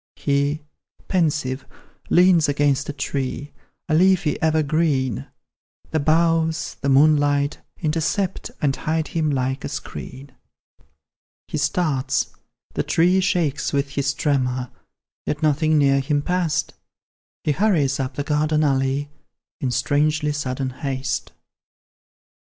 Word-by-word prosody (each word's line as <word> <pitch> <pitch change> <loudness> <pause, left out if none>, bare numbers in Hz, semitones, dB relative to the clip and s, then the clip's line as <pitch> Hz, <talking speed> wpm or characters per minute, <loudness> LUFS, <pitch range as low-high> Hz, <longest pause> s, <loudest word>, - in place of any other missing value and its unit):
He, 140 +1 0 0.4
pensive, 150 -7 0 0.5
leans 175 -4 +5
against 140 -1 +1
a - - +1
tree, 140 0 -3 0.3
A 160 - 0
leafy 175 -2 +3
evergreen, 155 - +1 0.6
The 160 - +1
boughs, 165 +2 +1
the 140 - 0
moonlight, 145 0 +3 0.2
intercept, 165 +5 -1
And 135 -2 +2
hide 160 0 -2
him 160 -2 0
like 130 -1 -1
a - - -3
screen 135 +2 -7 1.2
He 155 - -3
starts 145 -2 0 0.4
the - - 0
tree 180 +3 +3
shakes 170 -8 0
with 140 0 0
his 135 0 -1
tremor, 130 -4 0 0.6
Yet 150 +1 -2
nothing 155 +1 +3
near 140 -1 +4
him 145 +2 0
pass'd; 175 -3 0 0.7
He 150 - +1
hurries 150 -7 +2
up 130 0 -3
the 145 - -2
garden 155 +1 +1
alley, 135 0 0 0.5
In 130 - -1
strangely 150 +5 +1
sudden 135 -2 -3
haste. 130 0 -3
145 Hz, 115 wpm, -22 LUFS, 135-160 Hz, 1.2 s, leans